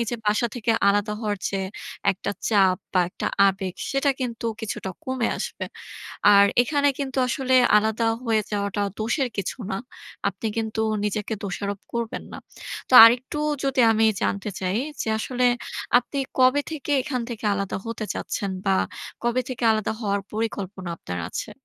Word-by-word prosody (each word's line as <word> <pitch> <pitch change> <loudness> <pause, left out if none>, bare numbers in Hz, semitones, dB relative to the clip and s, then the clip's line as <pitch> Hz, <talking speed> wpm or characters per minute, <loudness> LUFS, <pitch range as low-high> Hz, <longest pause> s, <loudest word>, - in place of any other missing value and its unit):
এই - - +1
যে 240 - -2
বাসা 210 +3 +2
থেকে 230 -1 +1 0.2
আলাদা 205 +1 0
হওয়ার 210 -2 -1
যে 195 - -1 0.5
একটা 190 - -4 0.2
চাপ 195 -4 +4 0.2
বা 185 - +4
একটা - - -4 0.2
আবেগ 190 -1 -3 0.2
সেটা 275 +1 +2
কিন্তু 235 -2 -3
কিছুটা 205 -3 -4
কমে 260 -2 0
আসবে। - - -4 0.7
আর 200 0 +8 0.2
এখানে 285 +3 +1
কিন্তু 270 -1 -3
আসলে 260 +1 +1 0.2
আলাদা 220 +2 +1 0.2
হয়ে 225 -3 +2
যাওয়াটা 205 0 -1 0.2
দোষের 245 +4 0
কিছু 200 +6 -3
না। 190 - -1 0.5
আপনি 200 +3 -5
কিন্তু 220 0 -1 0.2
নিজেকে 210 +1 -2
দোষারোপ 200 +1 -3
করবেন 235 -1 -3
না। - - -6 0.5
তো - - -1
আরেকটু 245 +5 +4 0.2
যদি 270 -2 +2
আমি 225 0 +3 0.2
জানতে 200 +1 -1
চাই 185 +2 -1 0.2
যে - - -4
আসলে 250 +2 0 0.5
আপনি 265 +3 -3 0.2
কবে 255 +3 +5
থেকে 295 -2 -4
এখান 255 -4 -2
থেকে 230 -2 -7
আলাদা 200 -1 -2
হতে 230 -1 -4
চাচ্ছেন? 200 -1 -3
বা 195 - +3 0.5
কবে 240 +2 +1
থেকে 255 -1 -5
আলাদা 215 -1 0
হওয়ার 200 -2 0
পরিকল্পনা 200 -4 -3
আপনার 90 0 -5
আছে? - - -5
220 Hz, 160 wpm, -24 LUFS, 200-250 Hz, 0.7 s, আর